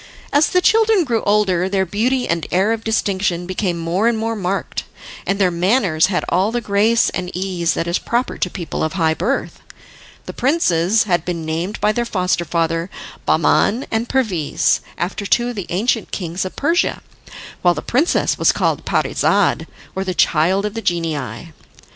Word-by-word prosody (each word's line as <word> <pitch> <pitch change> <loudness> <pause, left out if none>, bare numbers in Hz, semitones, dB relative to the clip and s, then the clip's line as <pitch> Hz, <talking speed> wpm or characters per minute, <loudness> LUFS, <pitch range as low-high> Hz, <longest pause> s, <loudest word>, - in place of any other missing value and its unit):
As 290 +2 +4
the 365 - +2
children 440 -2 +4
grew 235 -6 0
older 190 -3 +2
their 190 -1 +1
beauty 245 +8 0
and 170 -1 -1
air 190 +4 +2
of 225 -1 -2
distinction 195 -5 0
became 185 -1 -2
more 170 +6 0
and 235 -1 +2
more 225 +1 -2
marked, 195 -1 -3 0.4
and 195 - +1
their 190 -3 +2
manners 180 -2 +2
had 190 -2 -1
all 190 +5 +2
the 240 - -1
grace 220 +1 +2
and 180 -1 -4
ease 180 -3 -1
that 165 - -1
is 170 +1 0
proper 240 +2 -2
to 180 - 0
people 175 -2 -4
of 155 - -1
high 165 -4 +2
birth. 220 +12 -2 0.6
The - - -7
princes 220 - +2
had 175 -5 0
been 170 -3 -4
named 165 +6 -3
by 210 - +2
their 240 +2 -1
foster 180 -5 0
father 165 +1 -1 0.4
Bahman 235 +6 +2
and 225 +2 -1
Perviz, 200 - +1 0.2
after 195 +3 -3
two 240 +3 +2
of 245 - -6
the 200 -4 -5
ancient 220 +5 0
kings 175 0 -3
of 185 - -6
Persia, 330 +4 0 0.6
while 175 -1 +3
the - - -5
princess 285 +8 +1
was - - +5
called - - -1
Parizade, - - +1 0.3
or 190 - -2
the 185 -2 -3
child 180 +7 +2
of 210 - -3
the 225 - -4
genii. 165 - -3
190 Hz, 180 wpm, -19 LUFS, 175-225 Hz, 0.6 s, was